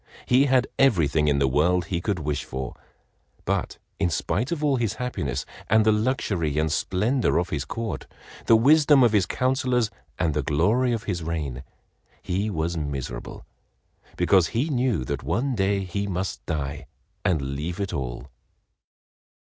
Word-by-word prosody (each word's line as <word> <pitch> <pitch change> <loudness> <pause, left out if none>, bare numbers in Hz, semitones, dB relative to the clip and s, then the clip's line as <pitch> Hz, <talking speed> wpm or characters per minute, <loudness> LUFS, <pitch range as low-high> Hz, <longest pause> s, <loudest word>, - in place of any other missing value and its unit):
He 130 +3 +4
had 130 -2 +3
everything 80 - +3
in 70 -1 +3
the 70 -1 +3
world 85 +6 +2
he 85 +1 -2
could 100 0 -1
wish 75 -3 -2
for, 65 -1 -5 0.7
but - - -1 0.2
in 95 -3 +2
spite 100 - -1
of 160 -3 -2
all 140 -3 +3
his 115 -4 0
happiness 125 - -3 0.2
and 110 0 +4
the 110 - +5
luxury 105 - 0
and 80 +1 +2
the - - +1
splendor 110 +11 +1
of 85 0 0
his 75 -1 -2
Court, 115 -1 -4 0.4
the 115 - +7
wisdom 145 +3 +6
of 120 - +5
his 100 -5 +2
councilors 125 -2 +1 0.3
and 85 -4 +1
the 75 - 0
glory 100 - +2
of 115 -2 -2
his 90 -6 -3
reign, 75 -6 -3 0.6
he 100 +4 -1
was 85 -2 -2
miserable 70 -6 -5 0.7
because 95 -4 +4
he 135 - -1
knew 125 - 0
that 70 +2 -3
one 120 - -1
day 100 -2 +1
he 100 +2 -3
must 95 0 -3
die 70 -3 -3 0.4
and 85 -4 +2
leave 85 +6 -4
it 100 -1 -2
all. - - -5
95 Hz, 165 wpm, -25 LUFS, 75-120 Hz, 0.7 s, the